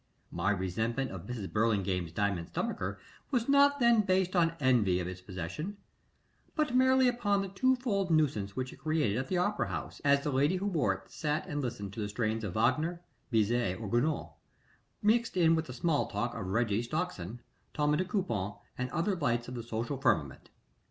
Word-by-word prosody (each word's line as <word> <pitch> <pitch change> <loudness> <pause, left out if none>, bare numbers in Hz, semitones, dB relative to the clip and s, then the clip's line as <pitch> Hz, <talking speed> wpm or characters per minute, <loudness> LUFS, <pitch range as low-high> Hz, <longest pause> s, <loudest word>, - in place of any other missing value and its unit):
My 100 - 0
resentment 110 +7 -1
of 95 -3 -8
Mrs. 115 -6 -5
Burlingame's 100 -6 +1
diamond 95 -2 -1
stomacher 100 +2 -3 0.3
was 245 -4 0
not 280 0 +5
then 235 -3 +5
based 185 -2 +1
on 165 -2 +3
envy 115 -9 +3
of 90 - -3
its 90 0 -7
possession, 95 - -5 0.8
but 300 -5 0
merely 260 0 +5
upon 205 -5 +1
the 195 - -5
twofold 225 -2 +1
nuisance 130 -12 +1
which 130 0 -3
it - - -14
created 145 -7 0
at 130 - -3
the 185 - 0
opera 205 +4 +1
house, - - -5
as 140 0 +4
the 150 - -1
lady 140 +6 +2
who 190 +2 -2
wore 165 - +2
it 95 +1 -15
sat 150 0 -1
and 145 -1 -3
listened 115 -6 -4
to 110 - -7
the 105 -1 -2
strains 110 +1 -1
of 100 -4 -3
Wagner, 165 +10 +1 0.3
Bizet, 115 -3 +1
or 110 - -5
Gounod, 120 +9 0 0.7
mixed 225 0 +2
in 165 -2 +5
with 160 0 +1
the 125 - -8
small 145 +3 +1
talk 120 +3 -2
of 105 -5 -5
Reggie 110 +1 +1
Stockson, 120 - -3 0.4
Tommie 150 0 +2
de 185 - 0
Coupon, 115 - -2 0.2
and 125 0 -1
other 175 +7 0
lights 120 -8 0
of - - -6
the 120 - -4
social 115 +4 -4
firmament. 75 - 0
130 Hz, 185 wpm, -31 LUFS, -, 0.8 s, not